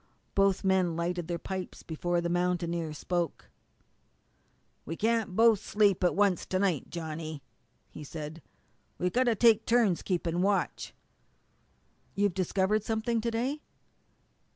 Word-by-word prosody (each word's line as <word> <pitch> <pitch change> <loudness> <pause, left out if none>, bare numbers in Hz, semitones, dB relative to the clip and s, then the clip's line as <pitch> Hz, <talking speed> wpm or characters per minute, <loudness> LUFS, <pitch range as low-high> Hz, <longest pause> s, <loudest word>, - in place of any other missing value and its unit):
Both 195 -1 +2
men 190 -3 +2
lighted 170 0 -2
their 175 - -2
pipes 185 +2 -6
before 175 +2 -1
the 170 - -1
mountaineer 170 -2 -1
spoke. 170 +3 -3 1.3
"We 165 - -5
can't 225 -1 0
both 225 -1 +5
sleep 205 -3 +2
at 180 - +3
once 200 -3 +2
to 185 - 0
night, 185 -7 0
Johnny," 160 -3 -6 0.5
he - - -9
said. 155 +2 -7 0.6
"We've 180 0 -1
got 255 +1 +3
to 235 -2 +3
take 225 0 +5
turns 230 -7 +3
keeping 175 -2 -1
watch." 200 +1 -1 1.2
"You've 205 -2 +2
discovered 190 +3 +1
something 225 +1 -1
to 235 - -1
day?" 255 +6 -2
185 Hz, 130 wpm, -29 LUFS, 170-215 Hz, 1.3 s, both